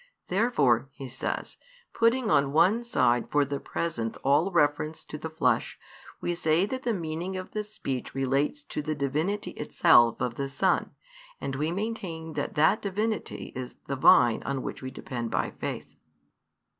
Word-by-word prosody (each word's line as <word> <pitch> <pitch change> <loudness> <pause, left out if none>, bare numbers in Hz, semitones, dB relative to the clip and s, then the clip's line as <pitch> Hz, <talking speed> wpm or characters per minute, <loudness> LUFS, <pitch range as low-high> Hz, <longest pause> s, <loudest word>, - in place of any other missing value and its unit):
Therefore," 145 - +2
he 135 -2 -8
says, 130 +1 -4 0.4
"putting 230 0 +2
on 140 -1 +3
one 190 +9 +4
side 120 - +2
for 145 -1 +3
the 140 0 -3
present 115 -10 -3
all 145 +7 +3
reference 150 -2 +1
to - - -8
the 155 +2 -5
flesh, 160 - 0 0.4
we 175 - -1
say 170 +1 +2
that 260 +5 -4
the 240 - 0
meaning 170 +2 -4
of 185 - -7
the 215 - -2
speech 135 -14 -5
relates 135 - 0
to 150 - -4
the 155 +1 -2
Divinity 155 +8 -1
itself 120 -6 +4
of 120 -2 -2
the 140 0 -2
Son; 135 - 0 0.4
and 135 - -3
we 150 +4 -1
maintain 185 -6 -4
that - - -3
that 160 +8 +4
Divinity 210 +2 -3
is 125 -1 -6
the 140 - -2
Vine 120 -3 +5
on 135 -2 -3
which - - -5
we 130 - -5
depend 120 -3 -5
by - - -1
faith." - - -6
155 Hz, 165 wpm, -28 LUFS, 135-195 Hz, 0.4 s, Vine